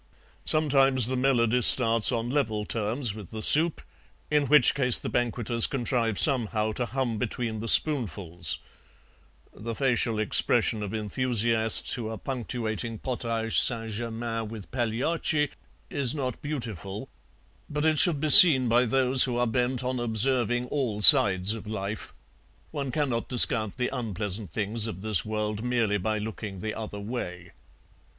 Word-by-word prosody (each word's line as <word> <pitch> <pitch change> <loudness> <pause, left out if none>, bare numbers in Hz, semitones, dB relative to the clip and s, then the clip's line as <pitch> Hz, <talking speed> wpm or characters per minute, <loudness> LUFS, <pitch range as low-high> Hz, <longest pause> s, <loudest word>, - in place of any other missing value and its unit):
Sometimes 135 -5 +3
the 130 +2 -2
melody 125 -2 0
starts 115 -2 +6
on 120 0 -4
level 110 -7 -2
terms 115 +2 -3
with 105 -4 -11
the 110 -1 -7
soup, 160 +6 +3 0.5
in 150 -2 0
which 150 -3 +4
case 125 -4 +3
the - - -6
banqueters 120 -1 -1
contrive 120 -5 -3
somehow 110 -6 +2
to 120 +3 -5
hum 120 -4 -4
between 115 -1 -4
the 115 - -7
spoonfuls; 95 - +1 1.0
the 115 +1 -8
facial 120 -4 -1
expression 110 +1 +1
of 100 -2 -6
enthusiasts 115 0 0
who 115 -3 -5
are 110 - -7
punctuating 115 -2 -6
potage 115 -2 -3
St. 115 -2 0
Germain 115 0 -5
with 105 -3 -11
Pagliacci 135 +5 -2 0.4
is 135 -1 0
not 130 -4 -5
beautiful, 110 - -6 0.6
but 150 +1 -4
it 155 -2 +2
should 165 -5 +4
be 155 +1 0
seen 135 -8 +10
by 120 +2 +2
those 130 +1 +3
who 125 -2 -4
are 120 - 0
bent 125 +2 -2
on 125 0 -4
observing 120 +1 +1
all 115 -8 -3
sides 95 +1 +6
of 110 -1 -10
life. 105 0 -6 0.6
One 140 -3 -5
cannot 125 -3 -3
discount 115 -4 +2
the 125 +1 -3
unpleasant 105 -4 -4
things 105 +3 0
of 95 -3 -8
this 105 -5 0
world 105 0 -5
merely 115 -4 -1
by 110 +3 -3
looking 105 -2 -8
the 110 +2 -5
other 105 -2 -8
way. 90 -6 -8
115 Hz, 145 wpm, -25 LUFS, 110-130 Hz, 1.0 s, seen